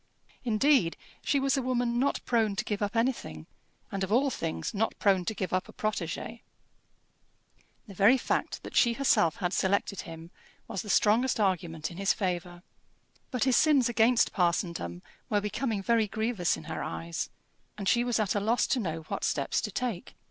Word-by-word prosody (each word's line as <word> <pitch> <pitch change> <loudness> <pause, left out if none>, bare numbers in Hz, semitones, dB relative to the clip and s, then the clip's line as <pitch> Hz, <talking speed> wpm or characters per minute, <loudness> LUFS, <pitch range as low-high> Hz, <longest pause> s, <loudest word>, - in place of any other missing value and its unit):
Indeed 235 - +3 0.3
she 280 - +2
was 275 +1 +2
a - - +1
woman 245 -1 0
not 275 +2 +1
prone 225 -4 +1
to - - -2
give 210 -1 -3
up 205 +2 -2
anything, 230 - -1 0.5
and 195 -1 -2
of 190 - -3
all 265 +4 +3
things 80 - -3
not 220 +2 -1
prone 190 -3 +2
to 220 - -2
give 185 -3 -3
up 185 - -1
a - - -11
protégé. 215 +2 -3 1.4
The 205 - -11
very 205 +7 +5
fact - - -2
that - - -9
she 235 - +4
herself 230 - +3
had 180 -1 -2
selected 200 0 0
him 165 +1 -10 0.4
was 210 -5 -3
the 210 - -9
strongest 225 +5 +3
argument 170 -6 -1
in 170 - -10
his 195 0 +2
favour. 175 -2 -3 0.7
But 250 -3 -1
his 260 -2 +3
sins 285 -6 +4
against 235 +1 +3
parsondom 170 - -1 0.3
were 205 - +2
becoming 210 0 -2
very 230 0 +2
grievous 220 - 0
in 80 - -10
her - - -5
eyes, 85 0 -4 0.5
and 200 -2 -4
she 240 +5 +3
was 240 -2 0
at 210 -3 +1
a 205 - +1
loss 225 +4 +2
to 260 - +1
know 165 -6 -3
what 160 - -5
steps - - 0
to - - -4
take. 235 -8 -4
210 Hz, 185 wpm, -29 LUFS, 180-240 Hz, 1.4 s, very